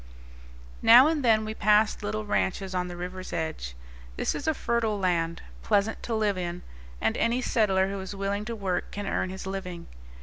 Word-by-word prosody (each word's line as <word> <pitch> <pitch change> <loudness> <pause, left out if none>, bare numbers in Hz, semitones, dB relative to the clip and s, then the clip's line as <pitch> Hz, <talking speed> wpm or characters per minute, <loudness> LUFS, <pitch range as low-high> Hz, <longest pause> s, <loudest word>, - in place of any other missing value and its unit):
Now 240 +3 +9
and 310 -2 +1
then 220 -2 +4
we 215 - -4
passed 210 0 +3
little 215 +1 -3
ranches 190 -1 -1
on 180 -1 -1
the 175 -1 -7
river's 185 +1 -6
edge. 160 - -4 0.4
This - - 0
is 290 - -5
a 315 - +2
fertile 230 -4 0
land, 170 -3 0 0.2
pleasant 200 - +1
to 230 - -2
live 210 -3 +1
in, 175 0 -4 0.4
and 110 - +1
any 235 +2 +1
settler 195 -6 +2
who 195 0 -4
is 190 +1 -6
willing 200 +1 -2
to 230 +1 -4
work 190 -4 -2
can 205 0 -5
earn 185 - -1
his 190 +1 -7
living. 185 -3 -5
200 Hz, 190 wpm, -27 LUFS, 180-220 Hz, 0.4 s, Now